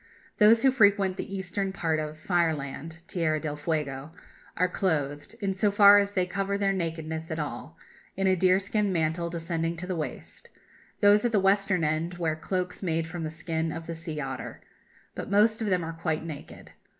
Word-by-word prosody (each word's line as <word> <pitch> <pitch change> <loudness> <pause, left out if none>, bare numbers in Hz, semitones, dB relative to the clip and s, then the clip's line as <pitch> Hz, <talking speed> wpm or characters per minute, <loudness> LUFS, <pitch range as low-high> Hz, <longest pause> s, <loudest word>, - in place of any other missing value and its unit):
Those 225 +2 +6
who 265 - +6
frequent 200 -6 +3
the 195 - -5
Eastern 190 +1 -3
part 165 -5 -1
of 155 0 -5
"Fireland" 160 -1 -2
(Tierra 155 -3 0
del 150 -1 -4
Fuego) 150 -1 -3 0.4
are 180 - +3
clothed, 150 -3 -2
in 195 -1 0
so 200 +2 +2
far 205 0 +8
as 200 0 -1
they 185 -2 +1
cover 195 +2 -2
their 200 -1 +1
nakedness 160 -2 -4
at 160 - -3
all, 150 +1 -5 0.4
in 195 - 0
a 190 -1 +4
deerskin 195 +3 +2
mantle 170 0 0
descending 165 0 -2
to 180 - -5
the 185 0 -3
waist; 155 -2 -7 0.5
those 205 0 +6
at 240 - +1
the 215 - +3
Western 195 -2 +2
end 160 +3 -1
wear 160 -3 0
cloaks 180 +2 -3
made 165 -3 0
from 165 +1 -6
the 155 - -2
skin 160 0 -3
of 165 +1 -6
the 170 - -5
sea 160 -2 -6
otter. 135 -2 -5 0.5
But - - -6
most 215 +3 +3
of 220 - -1
them 180 -3 +1
are 165 - -5
quite 160 -1 -2
naked. 155 -4 -9
170 Hz, 185 wpm, -27 LUFS, 160-195 Hz, 0.5 s, far